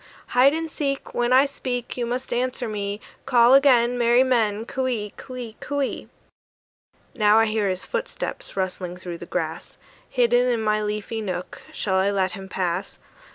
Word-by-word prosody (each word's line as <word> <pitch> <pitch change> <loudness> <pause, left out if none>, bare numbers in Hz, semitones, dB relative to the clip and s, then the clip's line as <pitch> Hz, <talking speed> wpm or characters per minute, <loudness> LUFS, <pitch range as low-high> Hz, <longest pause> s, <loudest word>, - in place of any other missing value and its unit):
"Hide 270 +4 +5
and 325 0 -2
seek! 275 -2 -3
"When 240 0 0
I 260 +2 +6
speak, 250 -3 -4
"You 240 -2 -2
must 250 +1 -3
answer 250 0 -1
me: 205 -1 -3 0.3
"Call 240 0 +6
again, 245 -3 +5
"Merry 240 +2 +5
men, 225 -4 +1
"Coo 260 +1 -2
ee, 210 -5 -3
coo 255 - -10
ee, 235 -3 -7
coo 285 0 -3
ee!" - - -4 1.1
Now 210 -2 +4
I 225 - +5
hear 215 -2 0
his 185 0 -2
footsteps, 480 - -5
rustling 180 -1 -3
through 175 -2 -7
the - - -9
grass: - - -4 0.3
Hidden 245 -1 +3
in 240 -2 +1
my 215 -1 +1
leafy 210 +2 -3
nook, 185 -3 -5
shall 190 -2 -1
I 190 +1 +3
let 190 -2 +1
him 190 +1 -8
pass? 180 +1 -2
235 Hz, 175 wpm, -24 LUFS, 200-250 Hz, 1.1 s, I